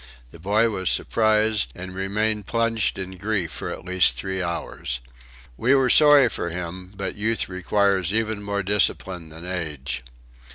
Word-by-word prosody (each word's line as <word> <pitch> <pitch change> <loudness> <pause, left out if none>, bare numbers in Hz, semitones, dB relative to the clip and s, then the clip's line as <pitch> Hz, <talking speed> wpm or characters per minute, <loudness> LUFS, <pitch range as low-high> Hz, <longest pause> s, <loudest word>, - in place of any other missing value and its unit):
The 85 - -13
boy 105 +6 +2
was 95 -3 -1
surprised, 110 -1 +2
and 95 +1 -7
remained 105 +2 -1
plunged 115 -2 0
in 95 -1 -6
grief 100 -5 -1
for 65 - -5
at - - -8
least 90 0 +3
three 95 -1 -3
hours. 85 -7 -3 0.6
We 130 +4 +3
were 130 -2 +3
sorry 145 -4 +7
for 85 - -2
him, 90 +2 -6
but 95 -1 -3
youth 110 +2 +1
requires 95 0 0
even 110 -1 -1
more 100 0 -2
discipline 95 -3 0
than 80 +2 -10
age. 75 -8 -4
95 Hz, 155 wpm, -23 LUFS, 90-110 Hz, 0.6 s, sorry